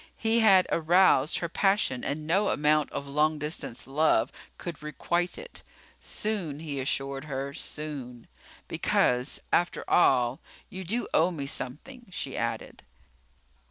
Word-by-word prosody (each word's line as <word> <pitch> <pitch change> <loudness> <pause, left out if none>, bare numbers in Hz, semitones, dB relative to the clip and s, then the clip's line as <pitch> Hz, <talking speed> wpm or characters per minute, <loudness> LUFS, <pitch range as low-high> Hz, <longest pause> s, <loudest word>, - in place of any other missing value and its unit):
He 225 +1 +2
had 195 -5 +6
aroused 165 -3 +4
her 170 - -2
passion 195 - +1
and 150 +2 -3
no 195 +6 +2
amount 150 0 +2
of 140 - -4
long 150 +2 +1
distance 150 -5 -4
love 135 -4 +2 0.3
could 170 -4 -7
requite 170 +3 -2
it. 485 +1 -8 0.4
Soon, 190 -9 -3
he 150 -3 -4
assured 135 +1 -1
her, 140 -1 -4
soon. 140 -6 -6 0.4
"Because, 125 +3 +1
after 175 - +1
all, 130 -5 +3 0.3
you 190 0 -6
do 225 +8 -2
owe 165 +3 +4
me 155 -6 -5
something," 240 - -5
she 185 - -5
added. - - -4
155 Hz, 130 wpm, -28 LUFS, 140-185 Hz, 0.4 s, had